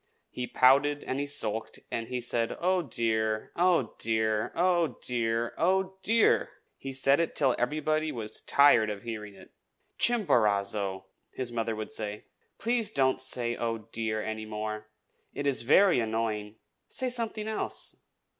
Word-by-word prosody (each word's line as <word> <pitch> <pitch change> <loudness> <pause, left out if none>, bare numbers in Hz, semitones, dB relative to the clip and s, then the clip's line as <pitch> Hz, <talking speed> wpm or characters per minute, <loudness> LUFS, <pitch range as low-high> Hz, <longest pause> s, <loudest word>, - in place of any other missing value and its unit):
He 125 0 -4
pouted, 140 +4 +4
and 130 - -3
he 145 - -2
sulked, 115 -6 0
and 115 -1 -3
he 125 - -3
said, 120 -1 -1
"Oh, 185 +1 +2
dear! 110 -5 -1
oh, 170 -9 +2
dear! 110 -1 0
oh, 170 -6 +1
dear! 115 -1 0
oh, 190 +2 +1
dear!" 225 +2 +3 0.3
He 135 - -7
said 135 +2 +3
it 170 - -1
till 135 -3 +3
everybody 155 +4 0
was 110 -3 -5
tired 130 -6 +5
of 105 -1 -5
hearing 105 -3 -6
it. - - -16 0.5
"Chimborazo," 100 - +1 0.3
his 125 -2 -3
mother 115 -1 -2
would 110 +5 -6
say, 105 -6 -4 0.3
"please 235 -2 +1
don't 130 -9 +1
say, 120 -2 0
'Oh, 115 -1 -2
dear!' 110 -1 -2
any 110 0 -5
more. 105 0 -5 0.5
It 145 - -3
is 140 -2 +2
very 175 +7 +5
annoying. 110 -2 -2 0.3
Say 255 -1 -2
something 225 -3 -2
else." 220 - -4
120 Hz, 145 wpm, -29 LUFS, 110-155 Hz, 0.5 s, tired